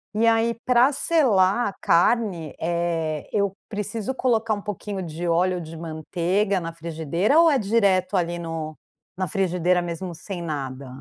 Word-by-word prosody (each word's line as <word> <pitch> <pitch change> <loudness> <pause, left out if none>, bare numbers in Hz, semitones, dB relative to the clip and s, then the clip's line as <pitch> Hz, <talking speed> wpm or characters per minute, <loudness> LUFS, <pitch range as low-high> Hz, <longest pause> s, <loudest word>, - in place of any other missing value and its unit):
E 225 +2 +3
aí, 230 +1 +3
pra 250 +2 +5
selar 240 - +3
a 195 - -9
carne, 175 -3 +2
eh, 165 -2 -2
eu 200 -2 +1 0.2
preciso 215 +3 -3
colocar 230 -4 +1
um 205 - -7
pouquinho 205 -1 -5
de 170 +1 -5
óleo 180 +2 +2
ou 175 - -4
de 160 0 -9
manteiga 175 +5 -1
na 165 0 -5
frigideira 170 - 0
ou 335 -1 +7
é 275 - +3
direto 200 -3 +2
ali 175 -1 -1
no 165 -2 -5 0.4
na 185 0 -1
frigideira, 180 0 +1
mesmo 175 +1 -5
sem 175 +2 -6
nada? 140 -4 -5
180 Hz, 160 wpm, -24 LUFS, 165-210 Hz, 0.4 s, ou